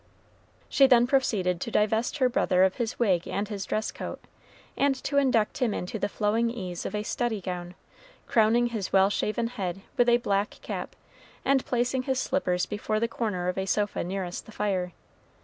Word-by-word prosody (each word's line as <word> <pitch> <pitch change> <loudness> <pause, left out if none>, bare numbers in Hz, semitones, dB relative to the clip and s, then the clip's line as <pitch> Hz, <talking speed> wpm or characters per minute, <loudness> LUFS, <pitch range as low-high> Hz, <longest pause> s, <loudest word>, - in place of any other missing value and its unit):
She 275 - +5
then 245 -2 +6
proceeded 205 -10 +1
to - - -3
divest 220 +3 +1
her 260 -3 +4
brother 185 -6 +2
of 190 0 +2
his 235 -3 -2
wig 190 -7 +2
and 205 +1 -2
his 200 -2 -4
dress 215 0 -1
coat, - - -6 0.6
and 275 0 +2
to 280 - -1
induct 250 -5 +1
him 245 -5 +1
into 185 +5 -4
the 205 - -1
flowing 220 +3 +1
ease 185 -7 -5
of - - -5
a 210 - -1
study 230 -1 -1
gown, 180 -1 -5 0.5
crowning 235 +2 +3
his 205 -4 -3
well 195 +1 +5
shaven 215 +3 -1
head 195 -6 -4 0.2
with 245 0 +4
a 240 - +6
black 205 -2 -1
cap, - - -5 0.5
and 270 -1 +3
placing 250 +1 +1
his 260 0 -1
slippers 180 -12 0
before 215 +1 -2
the 230 - +1
corner 205 -6 -2
of 180 +1 -1
a 190 - -2
sofa 205 0 0
nearest 180 0 -4
the - - -11
fire. 190 -4 -1
215 Hz, 185 wpm, -27 LUFS, 190-240 Hz, 0.6 s, then